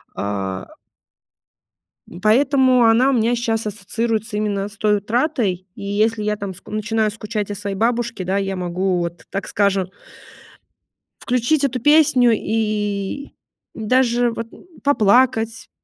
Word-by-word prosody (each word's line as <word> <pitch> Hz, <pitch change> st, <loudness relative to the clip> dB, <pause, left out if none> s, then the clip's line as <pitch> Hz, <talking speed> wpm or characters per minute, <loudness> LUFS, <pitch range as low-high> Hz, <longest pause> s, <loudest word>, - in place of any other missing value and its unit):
А 95 Hz, -2 st, -4 dB, 1.4 s
М, 175 Hz, -, -11 dB
поэтому 255 Hz, +2 st, +4 dB
она 230 Hz, +4 st, +4 dB
у -, -, +2 dB
меня 235 Hz, 0 st, +2 dB
щас 225 Hz, -2 st, -1 dB
ассоциируется 220 Hz, +1 st, -2 dB
именно 205 Hz, -2 st, -1 dB
с 205 Hz, 0 st, -12 dB
той 210 Hz, 0 st, +2 dB
утратой. 215 Hz, -, -1 dB
И -, -, -9 dB
если 210 Hz, +2 st, 0 dB
я 210 Hz, 0 st, 0 dB
там 200 Hz, -2 st, -6 dB
ск 185 Hz, -, -17 dB
начинаю 215 Hz, 0 st, 0 dB
скучать 210 Hz, -1 st, -4 dB
о -, -, -4 dB
своей 200 Hz, 0 st, -4 dB
бабушке, 235 Hz, 0 st, -1 dB
да, 190 Hz, +2 st, -1 dB
я 195 Hz, -1 st, -2 dB
могу 180 Hz, +1 st, -1 dB
вот, 170 Hz, 0 st, -5 dB
так 195 Hz, -, -4 dB
скажем 195 Hz, -2 st, +1 dB, 1.3 s
включить 250 Hz, +5 st, +1 dB
эту 255 Hz, -2 st, -2 dB
песню 275 Hz, -3 st, +5 dB
и 215 Hz, +3 st, -2 dB, 0.4 s
и -, -, -7 dB
даже 245 Hz, 0 st, +2 dB
вот 230 Hz, 0 st, -5 dB, 0.4 s
поплакать, 235 Hz, -3 st, +2 dB
215 Hz, 135 wpm, -20 LUFS, 200-240 Hz, 1.4 s, песню